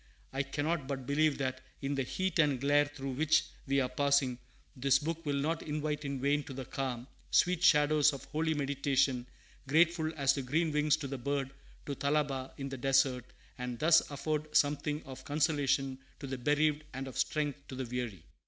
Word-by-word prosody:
I 135 - 0
cannot 145 +2 -2
but 135 -2 -4
believe 150 +2 +2
that, 130 -1 -2 0.2
in 140 +1 -2
the 135 - 0
heat 185 +8 -2
and 145 -5 +3
glare 145 +2 +4
through 135 -2 -6
which 155 +4 +2 0.2
we 140 +1 +2
are 130 - +1
passing, 135 -1 +1 0.4
this 135 +1 +3
book 165 +3 -4
will 145 - +1
not 155 +4 -1
invite 150 0 -3
in 140 -1 -3
vain 140 +2 +2
to 135 - -7
the 130 -1 -5
calm, 125 -3 -3 0.2
sweet 180 -1 +3
shadows 150 -2 +5
of 140 - -7
holy 160 +1 -1
meditation, 140 -3 +1 0.4
grateful 160 +2 +3
as 140 -1 +3
the 140 - -2
green 155 +5 0
wings 150 0 +3
of 140 - -5
the 135 - -4
bird 135 +1 -2 0.3
to 145 - -3
Thalaba 140 -2 0
in 135 0 -4
the 135 - -5
desert; 135 -1 +2 0.3
and 125 -1 -4
thus 165 +5 +6
afford 150 +1 -1
something 145 +1 +1
of 130 -1 -10
consolation 145 -3 +1 0.2
to - - -6
the 135 -1 -4
bereaved, 150 +3 +2
and 135 +1 -4
of 130 - -8
strength 145 -3 -1
to 130 - -7
the 130 0 -3
weary. 120 -8 -4
140 Hz, 190 wpm, -32 LUFS, 135-150 Hz, 0.4 s, thus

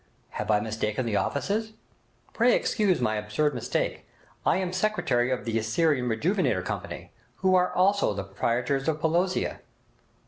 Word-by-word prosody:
Have 105 - -5
I 105 -1 +4
mistaken 110 +2 -2
the 110 -3 -1
offices?' 215 +9 -1 0.6
'Pray 240 +2 +4
excuse 205 -5 +1
my 110 -3 0
absurd 105 +9 0
mistake! 120 - -2 0.4
I - - +4
am 185 -1 -2
secretary 175 -12 +1
of 130 -1 -2
the 115 -1 0
"Assyrian 125 +3 +1
Rejuvenator 175 - 0
Company", - - -5 0.3
who 185 - +5
are 180 -1 +3
also 195 - +3
the 100 - -3
proprietors 120 +8 -1
of 155 -1 0
"Pelosia".' 175 +4 0
145 Hz, 145 wpm, -27 LUFS, 110-185 Hz, 0.6 s, who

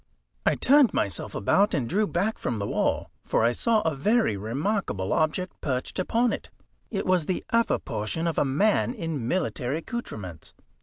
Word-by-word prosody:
I - - +4
turned 280 -2 +5
myself 100 - -2
about, 200 - +3
and 130 -6 -1
drew 210 - +1
back 195 +6 -1
from 120 - -2
the 100 - -2
wall, - - -1
for - - +1
I 120 - +4
saw 220 - +2
a 160 -4 0
very 210 - +2
remarkable 115 - -2
object 160 +4 -1
perched 130 +4 -2
upon 230 +6 +1
it. - - -5 0.4
It 200 -3 -2
was 180 -4 +2
the 185 - -1
upper 230 0 +3
portion 110 +9 -3
of 165 -2 0
a - - +4
man 200 - +2
in 160 - -3
military 145 -5 -1
accoutrements. 110 - -7
165 Hz, 170 wpm, -26 LUFS, -, 0.4 s, turned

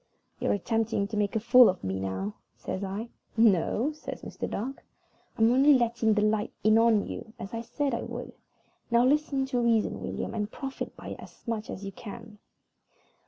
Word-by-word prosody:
"You're - - +1
attempting 220 0 0
to 220 - -4
make 205 0 0
a - - +3
fool 245 +2 +7
of 185 - -3
me 95 0 -2
now," 95 +1 -3 0.2
says 190 - -4
I. 200 +4 -4 0.3
"No," 225 - +3
says 305 0 -8
Mr. - - -5
Dark, 260 +6 -4 0.5
"I'm 225 +1 +5
only 275 +3 +6
letting 235 -3 +2
the 210 - +2
light 215 0 +1
in 215 +1 +5
on 225 -3 +4
you, 220 - -7
as 200 -3 -8
I 230 - -2
said 275 +4 -2
I - - -1
would. - - -6 0.6
Now 235 +1 +4
listen 280 -1 +2
to 255 -2 -1
reason, 230 -2 +1
William, - - -4
and 210 -2 -2
profit 270 -1 -6
by - - -8
it - - -7
as - - -14
much 220 -2 -3
as 195 - -6
you 195 - -5
can. 215 +1 -10
225 Hz, 190 wpm, -28 LUFS, 205-240 Hz, 0.6 s, fool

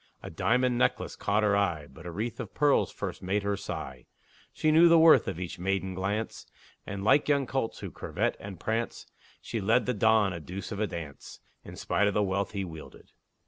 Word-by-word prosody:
A - - -7
diamond 125 0 +1
necklace - - 0
caught 105 +1 0
her 105 -1 +3
eye, 85 -7 0
But 80 +3 -12
a - - -5
wreath 110 +6 -4
of - - -7
pearls 145 -2 +3
first - - -6
made 100 +2 -1
her 100 0 0
sigh. 65 -9 -7 0.4
She 155 - +1
knew 165 +2 +7
the 165 - +7
worth 160 0 +6
of 80 - -3
each 90 -2 -6
maiden 95 +1 -1
glance, 100 +4 -3 0.4
And, 100 0 -5
like 145 +8 +4
young 140 -2 +3
colts, 130 -2 -3
that - - -7
curvet - - -2
and 100 -3 -9
prance, 115 +1 -2 0.4
She 115 - -3
led 115 +5 +3
the 125 - 0
Don 110 -2 +3
a 85 - -5
deuce 90 +6 -7
of 105 - -4
a 110 - +1
dance, 80 -6 -8 0.2
In - - -10
spite 105 - +1
of 100 - -1
the 105 - +3
wealth 100 +1 -1
he 100 -2 -2
wielded. 80 -3 -11
100 Hz, 210 wpm, -28 LUFS, 95-115 Hz, 0.4 s, knew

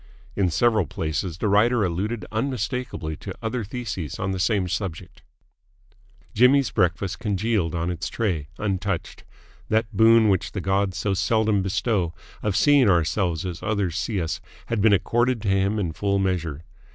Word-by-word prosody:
In 95 -3 +2
several 110 0 +2
places 80 +4 -3
the 105 - -1
writer 105 +2 +3
alluded 100 +6 -2
unmistakeably 115 - -3
to - - -7
other 115 +1 -3
theses 100 - -5
on 95 - -2
the 95 - -3
same 100 -1 +1
subject. 90 -2 -5 1.1
Jimmy's 130 +3 +4
breakfast 90 +2 0
congealed 105 -5 0
on 85 +1 -1
its 90 0 -4
tray, 90 -11 -2
untouched. 100 -3 -3 0.5
That 110 0 0
boon 115 +1 +6
which 95 -3 0
the 100 - -3
gods 95 0 0
so 100 0 0
seldom 110 +1 +2
bestow, 95 -3 -1 0.3
of 105 -3 -1
seeing 140 -2 +5
ourselves 85 0 +1
as 90 -1 -5
others 100 -6 -1
see 110 -2 -1
us, 80 -2 -3 0.2
had 115 -3 -1
been 110 +1 +5
accorded 120 +5 +2
to 100 - 0
him 95 +2 +1
in 90 -6 -2
full 100 +3 0
measure. 85 -6 -1
100 Hz, 155 wpm, -24 LUFS, 90-110 Hz, 1.1 s, boon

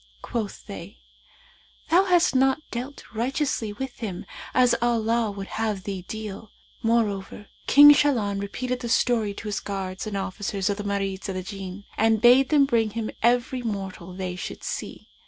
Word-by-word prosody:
Quoth 225 -5 -4
they, 200 -1 -9 0.9
'Thou 365 +4 +6
hast 355 -5 +4
not 265 +3 +3
dealt 255 +4 -5
righteously 240 -1 -1
with 265 +3 -6
him, 200 -6 -5 0.3
as 250 -1 +4
Allah 230 -1 +1
would 200 -1 -6 0.2
have 210 -4 -1
thee 195 -2 -4
deal.' 215 -1 -7 0.3
Moreover 210 -3 -1 0.2
King 290 +1 +10
Shahlan 225 -9 +1
repeated 250 +5 -3
the 235 - -5
story 225 -4 +2
to 215 - -7
his 205 -2 -1
guards 190 0 -4
and 205 -2 -3
officers 195 0 -2
of 200 - -3
the 205 - -4
Marids 195 -1 -2
of 190 - -3
the 185 - -3
Jinn 195 0 -7 0.2
and 225 0 +4
bade 250 +3 +6
them 290 -3 +5
bring 230 -5 +2
him 220 +1 -4
every 245 +2 +2
mortal 195 -5 -5
they 180 -1 -4
should 180 - -7
see. - - -5
220 Hz, 165 wpm, -25 LUFS, 195-245 Hz, 0.9 s, King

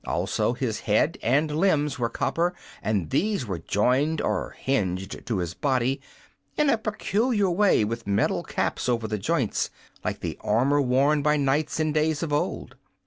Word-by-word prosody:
Also - - 0
his - - -2
head - - +3
and 150 +5 +1
limbs 150 -5 +1
were 115 -1 0
copper, 175 +8 0 0.3
and 100 -8 -1
these 205 -10 +1
were 95 -6 -4
jointed 130 - +1
or - - -2
hinged 95 -8 -2
to 115 - 0
his 85 -2 -2
body 130 +3 0 0.6
in 300 -2 +4
a - - +3
peculiar 215 -1 0
way, 190 - +3
with 115 0 -5
metal 100 0 +1
caps - - -2
over 115 -2 0
the 105 -1 -2
joints, 130 +1 0 0.3
like - - -3
the - - -4
armor 130 +7 +2
worn 140 +3 +3
by 150 +1 +3
knights 145 +3 0
in 155 -1 +1
days 155 +1 +1
of 155 -3 -2
old. 145 - -2
140 Hz, 165 wpm, -25 LUFS, 115-160 Hz, 0.6 s, in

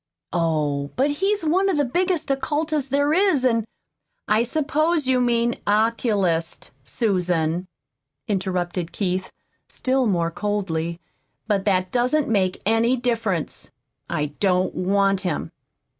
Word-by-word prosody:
"Oh, 150 -4 0
but 275 +3 +2
he's 390 +6 0
one 370 +5 +2
of 370 - +1
the 290 - +2
biggest 345 +2 0
occultists 295 +1 -1
there 285 +2 +2
is, 360 -7 +3
an' 230 -3 +2 0.3
" - - -59 0.3
"I 215 +1 +3
suppose 310 +4 0
you 255 -1 +2
mean 235 -1 +1
'oculist,' 205 -6 0
Susan," 180 - 0 0.6
interrupted 180 -3 -2
Keith, 185 -1 -2 0.4
still 260 -1 0
more 170 -4 +1
coldly; 170 -4 -2 0.5
"but 205 -3 0
that 185 -2 +1
doesn't 255 +5 +1
make 190 -4 0
any 225 +4 +3
difference. 230 -9 -2 0.4
I 150 -1 -2
don't 185 -2 +2
want 195 +1 +2
him." 180 -5 -3
215 Hz, 125 wpm, -23 LUFS, 180-270 Hz, 0.6 s, is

